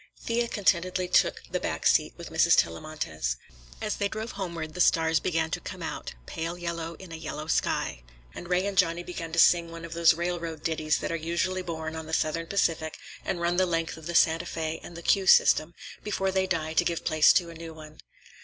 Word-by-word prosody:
Thea 235 Hz, +1 st, 0 dB
contentedly 185 Hz, -3 st, +1 dB
took 180 Hz, -, +2 dB
the -, -, 0 dB
back -, -, -3 dB
seat -, -, +3 dB
with -, -, -9 dB
Mrs. -, -, +4 dB
Tellamantez. 80 Hz, -, -1 dB, 0.4 s
As 210 Hz, -, -2 dB
they 200 Hz, -, +1 dB
drove 220 Hz, +3 st, -5 dB
homeward 170 Hz, -5 st, -5 dB
the 180 Hz, -, -2 dB
stars 160 Hz, -1 st, +4 dB
began 165 Hz, -2 st, -1 dB
to -, -, -1 dB
come -, -, -7 dB
out, -, -, -5 dB
pale 165 Hz, -, -4 dB
yellow 170 Hz, -1 st, -4 dB
in 185 Hz, +1 st, -12 dB
a -, -, -5 dB
yellow 155 Hz, -1 st, -5 dB
sky, 110 Hz, -, 0 dB, 0.3 s
and 175 Hz, -, -9 dB
Ray 180 Hz, +1 st, +2 dB
and 200 Hz, -1 st, -2 dB
Johnny 175 Hz, -2 st, +2 dB
began 170 Hz, -2 st, -6 dB
to 165 Hz, -, -4 dB
sing 170 Hz, 0 st, +5 dB
one 165 Hz, 0 st, -8 dB
of 165 Hz, -, -8 dB
those 170 Hz, -1 st, +5 dB
railroad 170 Hz, -2 st, -3 dB
ditties 155 Hz, -1 st, +1 dB
that -, -, -2 dB
are -, -, 0 dB
usually 170 Hz, +3 st, -1 dB
born 160 Hz, -2 st, -5 dB
on 160 Hz, -1 st, -6 dB
the 160 Hz, -, -7 dB
Southern 165 Hz, +2 st, 0 dB
Pacific 165 Hz, -5 st, 0 dB, 0.3 s
and 175 Hz, -, -2 dB
run 170 Hz, +1 st, +1 dB
the 185 Hz, 0 st, +3 dB
length 165 Hz, -1 st, -1 dB
of 160 Hz, 0 st, -10 dB
the 170 Hz, -, -3 dB
Santa 165 Hz, +1 st, +4 dB
Fé 160 Hz, -1 st, -3 dB
and 170 Hz, -, -10 dB
the 170 Hz, -, -9 dB
"Q" 195 Hz, +1 st, +2 dB
system 155 Hz, -2 st, +5 dB, 0.3 s
before 195 Hz, -2 st, -1 dB
they 190 Hz, 0 st, +1 dB
die 160 Hz, -3 st, -1 dB
to 175 Hz, -, +3 dB
give 170 Hz, -1 st, -2 dB
place 155 Hz, -2 st, +6 dB
to 170 Hz, -2 st, +1 dB
a -, -, -10 dB
new 165 Hz, 0 st, -8 dB
one. 155 Hz, -1 st, -12 dB
165 Hz, 220 wpm, -27 LUFS, 160-180 Hz, 0.4 s, place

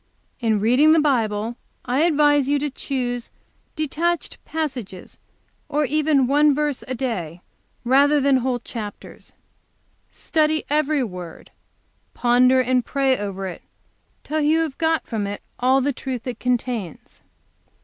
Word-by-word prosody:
"In 220 Hz, -4 st, +1 dB
reading 255 Hz, +9 st, +5 dB
the 325 Hz, -, +5 dB
Bible 230 Hz, -5 st, 0 dB, 0.3 s
I 250 Hz, +2 st, 0 dB
advise 290 Hz, -4 st, +3 dB
you 290 Hz, -, +3 dB
to 290 Hz, 0 st, -2 dB
choose 245 Hz, -3 st, -3 dB, 0.5 s
detached 320 Hz, +3 st, -2 dB
passages, 260 Hz, -, -5 dB, 0.5 s
or 300 Hz, 0 st, +1 dB
even 295 Hz, -1 st, +2 dB
one 290 Hz, +2 st, +4 dB
verse 295 Hz, -2 st, -1 dB
a 255 Hz, -, -3 dB
day, 180 Hz, -10 st, -4 dB, 0.4 s
rather 285 Hz, +4 st, +4 dB, 0.2 s
whole 250 Hz, 0 st, -1 dB
chapters. 225 Hz, -3 st, -9 dB, 0.8 s
Study 310 Hz, -1 st, 0 dB
every 300 Hz, -2 st, +2 dB
word, 180 Hz, -6 st, -8 dB, 0.6 s
ponder 250 Hz, +2 st, +4 dB
and 255 Hz, 0 st, +1 dB
pray 270 Hz, 0 st, +1 dB
over 195 Hz, -3 st, -5 dB
it 180 Hz, -2 st, -6 dB, 0.6 s
till 310 Hz, +1 st, -2 dB
you 310 Hz, +2 st, +3 dB
have 310 Hz, -4 st, -4 dB
got 320 Hz, -1 st, +1 dB
out 220 Hz, -, 0 dB
of -, -, -1 dB
it 205 Hz, 0 st, -6 dB, 0.2 s
all 260 Hz, +2 st, +3 dB
the 280 Hz, +2 st, 0 dB
truth 255 Hz, -2 st, -5 dB
it 245 Hz, -3 st, -5 dB
contains. 245 Hz, -, -3 dB
260 Hz, 135 wpm, -22 LUFS, 235-295 Hz, 0.8 s, reading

